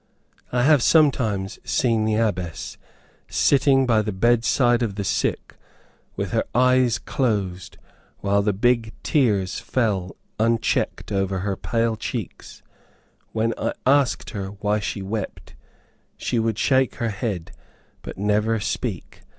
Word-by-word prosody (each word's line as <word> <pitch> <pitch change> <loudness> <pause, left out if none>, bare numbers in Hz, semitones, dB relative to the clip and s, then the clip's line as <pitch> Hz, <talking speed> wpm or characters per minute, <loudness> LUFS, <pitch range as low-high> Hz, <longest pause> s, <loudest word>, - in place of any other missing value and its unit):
I 125 0 +1
have 145 -1 +5
sometimes 115 -11 +2
seen 110 +3 +1
the 110 0 +1
Abbess 95 -7 -2 0.5
sitting 135 -1 +3
by 115 -3 +3
the 105 0 -3
bedside 120 +3 +2
of 110 -5 -1
the 100 - -3
sick, 95 - -1 0.6
with - - -3
her - - +1
eyes 125 -1 +4
closed, 100 -10 -2 0.4
while 100 0 +1
the 105 +1 +1
big 115 +2 +1
tears 105 -10 +1
fell 100 -7 -1 0.2
unchecked 115 -1 0
over 95 -1 -1
her 100 0 -1
pale 115 +1 -1
cheeks. 110 -1 -6 0.7
When 115 +1 0
I - - -1
asked 135 0 +2
her 100 -4 -4
why 105 +1 -1
she 100 -1 -4
wept, 100 0 -5 0.6
she 120 - -1
would 110 -1 0
shake 130 +2 +2
her 115 - -2
head, 100 -5 -4 0.5
but - - -8
never 105 +3 +1
speak. - - -4
110 Hz, 130 wpm, -23 LUFS, 100-120 Hz, 0.7 s, have